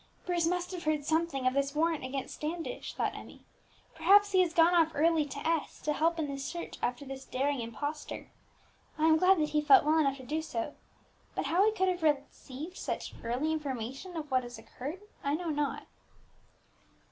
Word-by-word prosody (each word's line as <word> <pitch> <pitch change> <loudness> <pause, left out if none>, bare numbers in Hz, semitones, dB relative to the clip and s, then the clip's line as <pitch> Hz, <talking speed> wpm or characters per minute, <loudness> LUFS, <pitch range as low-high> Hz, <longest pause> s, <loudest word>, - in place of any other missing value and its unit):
"Bruce 345 -2 +1
must 360 +1 -1
have 355 -3 -6
heard 305 -2 0
something 315 -4 0
of 255 - +3
this 280 +1 0
warrant 325 -1 +1
against 265 +1 -4
Standish," 330 +9 -5
thought - - 0
Emmie; - - -11 0.5
"perhaps 410 +1 +5
he 375 - +4
has 355 -3 +2
gone 335 +1 +5
off 325 -2 +4
early 320 0 +3
to 285 - -8
S, 325 -2 -1
to 300 - +1
help 330 +3 +1
in 320 - 0
the 280 -1 -5
search 340 +5 -5
after 245 +4 -2
this 270 0 -7
daring 275 0 -1
impostor. 285 +7 -5 0.7
I 310 - +2
am 320 0 +6
glad 370 +3 +5
that 305 -1 +1
he 300 - +2
felt 290 -2 +6
well 315 +1 +4
enough 275 -3 +2
to 260 - -11
do 310 +5 -1
so; 245 -3 -4 0.6
but - - -1
how 355 +4 +3
he - - +4
could 380 -3 +1
have 365 -1 0
received 295 +2 -2
such - - -4
early 255 +7 0
information 275 +3 -4
of 300 -3 -6
what 255 -1 +3
has 240 -1 -9
occurred, 280 - -7 0.2
I 280 +1 +1
know 340 0 -2
not." 295 -1 -2
305 Hz, 195 wpm, -31 LUFS, 275-335 Hz, 0.7 s, am